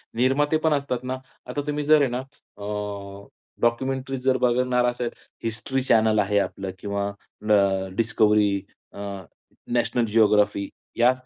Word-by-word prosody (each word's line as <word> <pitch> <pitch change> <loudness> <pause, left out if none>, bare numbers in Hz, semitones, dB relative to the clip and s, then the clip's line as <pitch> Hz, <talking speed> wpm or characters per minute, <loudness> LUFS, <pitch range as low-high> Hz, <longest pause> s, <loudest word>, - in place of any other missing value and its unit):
निर्माते 135 +6 +2
पण 160 - +4
असतात 140 -4 -1
ना 130 +1 -3 0.3
आता 145 +3 -2
तुम्ही 150 0 -1
जर 155 0 +6
आहे 140 - +3
ना 125 - -1 0.4
अ, 100 -1 -5 0.3
डॉक्युमेंटरी 130 +3 0
जर 130 0 +2
बघणार 125 0 +2
असाल, 120 0 -1 0.3
हिस्ट्री 115 +4 -2
चॅनल 110 -3 +4
आहे 105 0 +2
आपलं 95 -1 -3
किंवा 100 0 -2
अ, 100 -1 0
डिस्कव्हरी 105 -3 +3 0.3
अ, - - -10 0.7
नॅशनल 120 0 +1
जिओग्राफी 105 -2 +3 0.3
या 120 +2 +6
115 Hz, 135 wpm, -24 LUFS, 105-130 Hz, 0.7 s, जर